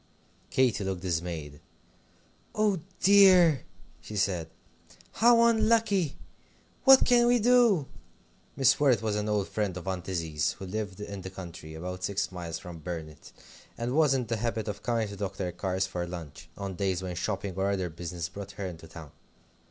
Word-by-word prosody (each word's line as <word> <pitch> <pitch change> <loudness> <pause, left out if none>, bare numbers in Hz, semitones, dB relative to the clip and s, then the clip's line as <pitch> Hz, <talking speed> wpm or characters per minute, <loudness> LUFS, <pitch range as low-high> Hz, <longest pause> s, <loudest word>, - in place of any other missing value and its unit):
Katy 125 -5 +2
looked 95 -2 -4
dismayed. 80 -4 -3 1.0
"Oh 210 -4 +2 0.2
dear!" 185 -7 +6 0.4
she 105 - -9
said, 90 -4 0 0.6
"how 235 +1 +5
unlucky. 220 -7 +2 0.7
What 270 -1 +8
can 240 -1 +4
we 245 0 +5
do?" 235 - +4 0.7
Mrs. 135 -1 +4
Worrett 135 -6 +3
was 110 -2 0
an 105 0 -2
old 105 -2 0
friend 100 -4 -2
of 90 - -8
Aunt 95 -1 -3
Izzie's, 80 -5 -1
who 95 - -9
lived 100 0 -5
in 100 -1 -6
the 95 - -7
country, 85 -4 -9
about 90 +3 -6
six 100 +1 -1
miles 85 -3 -5
from 85 0 -10
Burnet, 80 -2 -7 0.5
and 120 +2 -2
was 150 -2 +4
in 125 -2 -1
the 115 0 -2
habit 115 -1 -2
of 105 -1 -5
coming 115 -2 0
to 100 - -8
Dr. 95 -2 -4
Carr's 95 +1 -1
for 90 -2 -4
lunch, 85 -1 -9
on 100 -1 -4
days 95 0 -1
when 90 -1 -4
shopping 100 +1 -3
or 95 +1 0
other 95 -3 -1
business 85 0 -5
brought 100 +2 -9
her 100 - -5
into 80 -3 -8
town. 80 -3 -11
100 Hz, 165 wpm, -28 LUFS, 90-130 Hz, 1.0 s, What